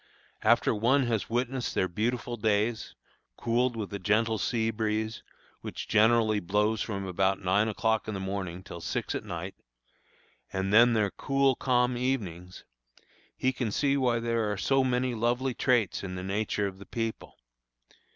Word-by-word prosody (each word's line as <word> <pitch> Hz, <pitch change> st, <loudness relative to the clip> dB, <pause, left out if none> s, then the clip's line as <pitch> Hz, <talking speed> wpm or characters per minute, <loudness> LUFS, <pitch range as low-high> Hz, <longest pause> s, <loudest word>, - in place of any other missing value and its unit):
After -, -, +3 dB
one 125 Hz, +6 st, +3 dB
has 115 Hz, -4 st, -1 dB
witnessed 125 Hz, +2 st, -1 dB
their 95 Hz, -, +2 dB
beautiful 120 Hz, +5 st, -2 dB
days, 110 Hz, +1 st, 0 dB, 0.4 s
cooled 120 Hz, +1 st, +1 dB
with 105 Hz, -2 st, -5 dB
a 100 Hz, -, -3 dB
gentle 110 Hz, +3 st, +1 dB
sea 110 Hz, +4 st, 0 dB
breeze, 110 Hz, 0 st, -2 dB, 0.4 s
which -, -, -7 dB
generally 110 Hz, 0 st, +4 dB
blows 105 Hz, +4 st, 0 dB
from 100 Hz, -3 st, -3 dB
about 95 Hz, +1 st, +1 dB
nine 100 Hz, +4 st, +2 dB
o'clock 110 Hz, 0 st, 0 dB
in 110 Hz, -, -3 dB
the -, -, -3 dB
morning 95 Hz, -2 st, -4 dB
till 85 Hz, -, -9 dB
six -, -, -3 dB
at -, -, -3 dB
night, -, -, -5 dB, 1.0 s
and 95 Hz, +1 st, -2 dB
then 120 Hz, +2 st, +7 dB
their 105 Hz, -3 st, +1 dB
cool, 135 Hz, -1 st, +2 dB
calm 125 Hz, -1 st, +1 dB
evenings, 95 Hz, -9 st, -3 dB, 0.7 s
he 130 Hz, 0 st, +1 dB
can 120 Hz, -4 st, -2 dB
see 140 Hz, +5 st, +1 dB
why 125 Hz, -4 st, +2 dB
there 115 Hz, -2 st, 0 dB
are 105 Hz, -, -3 dB
so 135 Hz, +6 st, +2 dB
many 125 Hz, 0 st, 0 dB
lovely 120 Hz, +3 st, 0 dB
traits 120 Hz, -7 st, +1 dB
in 90 Hz, -1 st, -5 dB
the 90 Hz, -, -5 dB
nature 100 Hz, +1 st, -1 dB
of 95 Hz, -1 st, -5 dB
the 100 Hz, -, -12 dB
people. 115 Hz, -1 st, -4 dB
110 Hz, 160 wpm, -28 LUFS, 100-120 Hz, 1.0 s, then